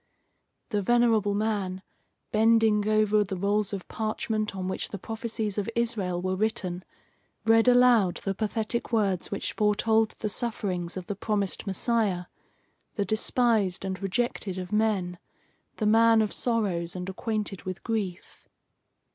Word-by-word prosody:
The 210 -3 0
venerable 225 -2 +3
man, 200 -3 -1 0.5
bending 220 -1 +4
over 215 -1 +3
the 195 -1 -5
rolls 200 +2 0
of 195 -3 -5
parchment 215 -1 -2
on 185 -1 -3
which 190 - -3
the 200 - -5
prophecies 220 0 -3
of 205 - -2
Israel 215 -7 0
were 185 0 0
written, 185 -3 -1 0.6
read 225 +1 +5
aloud 245 -7 +5
the 195 - -1
pathetic 220 +4 -2
words 200 -6 +1
which 200 - -3
foretold 220 +1 +2
the 215 - -3
sufferings 195 -6 -3
of 185 - -5
the 205 - -3
promised 205 0 -1
Messiah 195 -2 0 0.7
the 205 - 0
despised 215 -2 +1
and 190 0 -4
rejected 195 -1 -2
of 185 +2 -5
men, 200 -5 0 0.6
the 215 - -2
man 225 +1 +5
of 210 - -2
sorrows 195 -8 -1
and 180 0 -5
acquainted 210 0 -3
with 185 0 -6
grief. 205 -6 -4
210 Hz, 140 wpm, -27 LUFS, 190-225 Hz, 0.7 s, read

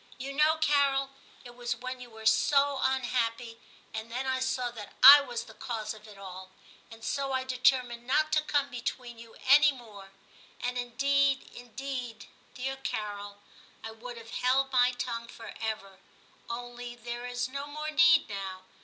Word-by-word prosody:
You 270 +2 -6
know, 305 +3 +4
Carol, 280 -3 +2 0.3
it 240 - -10
was 240 -1 -3
when 255 +2 -6
you 245 - -10
were 220 -1 -12
so 280 +4 +3
unhappy; 240 -3 -1 0.3
and 220 +1 -6
then 255 +3 -3
I 260 0 0
saw 260 -1 -1
that 215 -4 -10
I 285 +2 +12
was 240 -4 -5
the - - -14
cause 225 -4 -4
of 215 0 -14
it 210 -2 -13
all; 190 -1 -9 0.4
and 225 0 -13
so 275 -1 -1
I 260 0 0
de 255 -1 -5
termined 250 -2 +2
not 310 +4 +2
to 305 - +3
come 285 -2 0
between 240 -1 -5
you 230 -1 -13
any 295 +3 +7
more; 215 -7 -12 0.5
and, 245 0 -2
indeed, 275 +3 +1
indeed, 245 -1 -6 0.3
dear 270 +1 -3
Carol, 205 -5 -5 0.4
I 225 - -6
would 235 +2 -9
have 230 0 -11
held 270 +2 +1
my 250 -1 +4
tongue 235 -1 -4
for 230 - -10
ever, 195 -4 -4 0.5
only 245 0 -6
there 240 0 -6
is 245 0 -2
no 280 +2 -6
more 305 +1 -5
need 335 +1 +5
now. 195 -2 -6
245 Hz, 170 wpm, -29 LUFS, 230-270 Hz, 0.5 s, I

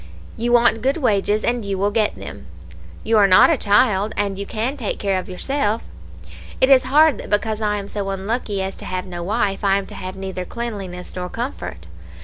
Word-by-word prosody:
You 240 +1 -1
want 235 -2 +4
good 270 +5 +1
wages, 210 -6 +1
and 240 -1 0
you 200 -1 -3
will 200 +2 +1
get 215 0 +1
them; - - -9 0.6
you 225 -1 +3
are 200 - +6
not 185 - +7
a - - +4
child, 205 -1 +2
and 200 -1 -1
you 200 - -5
can 230 +6 -2
take 240 -8 -3
care 195 -2 0
of 185 - -8
yourself. 220 +3 -1 0.8
It 260 - +4
is 255 -2 +6
hard 305 +2 +5
that - - -8
because 215 +1 0
I 210 -1 0
am 200 -1 -5
so 200 -1 -3
unlucky 200 +1 -2
as 190 0 -4
to - - -7
have 185 0 -3
no 175 -2 -6
wife, 200 +1 -1
I 195 -1 +3
am 200 - -3
to - - -11
have 185 +1 -6
neither 190 -1 -5
cleanliness 195 -5 -6
nor 180 -1 -4
comfort. 230 - -5
205 Hz, 210 wpm, -21 LUFS, 195-235 Hz, 0.8 s, not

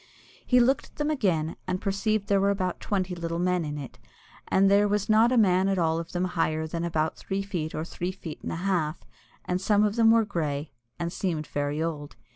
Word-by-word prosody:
He 250 - +4
looked 260 +3 +2
at - - -26
them 295 +1 -1
again, 175 - 0
and 185 - -1
perceived 200 +2 0
that - - -22
there 200 -1 +3
were 200 - +3
about 185 -3 -1
twenty 185 -3 -1
little 170 -1 -3
men 180 0 +1
in 150 -1 -4
it, 140 -3 -8 0.5
and 195 +1 +4
there 200 +1 +5
was 205 0 -1
not 220 +3 +5
a 255 - +3
man 190 -3 +4
at 195 - +1
all 165 -1 +1
of 165 0 -7
them 180 0 -1
higher 160 -3 0
than 165 +1 -4
about 160 -2 -1
three 195 +1 -3
feet 175 -6 -4
or 155 - -3
three 175 +1 -4
feet 175 -5 -9
and - - -4
a - - -3
half, 170 -5 0 0.4
and 180 0 -1
some 205 +1 +3
of 210 +2 0
them 225 -1 +6
were 225 -1 +5
grey, 150 -6 -3 0.3
and 170 0 -3
seemed 165 -6 -2
very 145 +2 -2
old. 150 -3 -4
180 Hz, 230 wpm, -27 LUFS, 160-200 Hz, 0.5 s, them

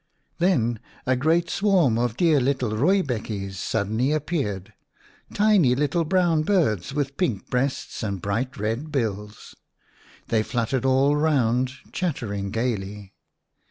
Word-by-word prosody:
Then 120 - +2 0.3
a 130 - +2
great 160 +6 +2
swarm 175 - +2
of 120 -1 -1
dear 165 -5 +4
little 130 -3 0
rooibekkies 120 - 0
1 - - -10
suddenly 110 +7 -1
appeared, 140 - -2 0.6
tiny 205 -12 +4
little 150 +4 0
brown 175 -2 +2
birds 155 - +1
with 140 -1 -2
pink 120 - -2
breasts 130 +2 -2
and 100 -4 -3
bright 115 +9 -2
red 115 +9 -3
bills. 105 -5 -3 0.8
They 115 -2 +2
fluttered 120 +3 -1
all 135 +2 +3
round, 130 -5 +1 0.2
chattering 110 - -3
gaily. 105 -3 -3
130 Hz, 125 wpm, -24 LUFS, 110-155 Hz, 0.8 s, dear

